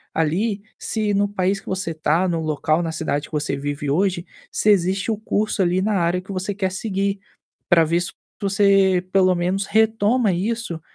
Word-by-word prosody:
ali 195 +7 0 0.2
se, 215 -2 -1
no 200 +1 +2
país 195 0 0
que - - -21
você 190 -2 -2
está, 160 +3 +1
no 170 -2 -1
local, 155 +1 0
na 165 - -2
cidade 150 -2 -2
que - - -24
você 150 -2 -1
vive 145 0 -3
hoje, 175 +2 0 0.3
se 215 - +1
existe 195 +1 +2
o 215 - -1
curso 215 -2 0
ali 180 +1 +1
na 215 +2 0
área 175 0 +1
que 190 +2 -10
você 190 +2 -2
quer 190 -1 -2
seguir, 195 0 -2 0.5
pra 170 -2 +6
ver 170 +2 +1
su 175 - -3 0.3
para 200 - -1
você 195 -2 +4
pelo 185 -1 +4
menos 185 +3 -1
retoma 220 0 +2
isso 195 -3 -2
190 Hz, 190 wpm, -21 LUFS, 170-200 Hz, 0.5 s, pra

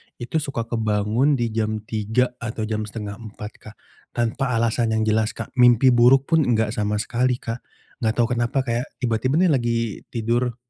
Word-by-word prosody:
Itu, 130 +7 -2
suka 135 -6 -3
kebangun 115 +4 +1
di 120 -3 -1
jam 110 -1 -2
3:00 110 +4 0
atau 110 -1 -4
jam 110 -1 -2
3:30, 105 0 -7
Kak. 105 +1 -13 0.4
Tanpa 120 +2 0
alasan 115 0 +1
yang 110 - +1
jelas, 110 0 +1
Kak, - - -7
mimpi 125 +1 +6
buruk 130 +5 +4
pun 160 -3 +4
enggak 110 -3 +2
sama 105 -1 -1
sekali, 120 +4 0
Kak. 115 0 -5 0.4
Gak 110 -1 0
tahu 120 0 +1
kenapa 125 +3 0
kayak, 120 0 -2 0.2
tiba-tiba 120 +4 +1
nih 175 -1 +4
lagi 120 -3 +1 0.3
tidur, 120 +1 -1
115 Hz, 170 wpm, -23 LUFS, 110-125 Hz, 0.4 s, mimpi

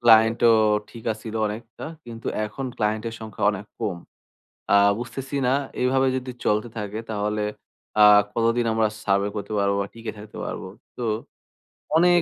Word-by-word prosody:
ক্লায়েন্টও 115 0 +6 0.4
ঠিক 115 -1 -3
ছিল 110 -1 -6
অনেকটা, 110 +3 -7 0.2
কিন্তু 115 -1 -9 0.2
এখন 130 +6 -6
ক্লায়েন্টের 110 +1 -1
সংখ্যা 110 -2 -4
অনেক 100 0 -6
কম। 105 -6 -1 0.8
আ - - +8 0.2
বুঝতেছি 135 +3 -5
না, 130 - +3 0.3
এভাবে 130 +1 +3
যদি 130 0 -5
চলতে 105 +2 +2
থাকে 105 0 -4
তাহলে 105 0 -1 0.6
আ - - +10 0.3
কতদিন 115 +1 +2
আমরা 110 -1 +3 0.2
সার্ভে 100 0 +2
করতে 105 +1 -4
পারবো? 100 0 +2
বা 100 - -3
টিকে 115 -1 -6
থাকতে 105 0 -10
পারবো? - - -5 0.3
তো, 125 - -4 0.9
অনেক 175 +1 +5
110 Hz, 145 wpm, -24 LUFS, 105-120 Hz, 0.9 s, আ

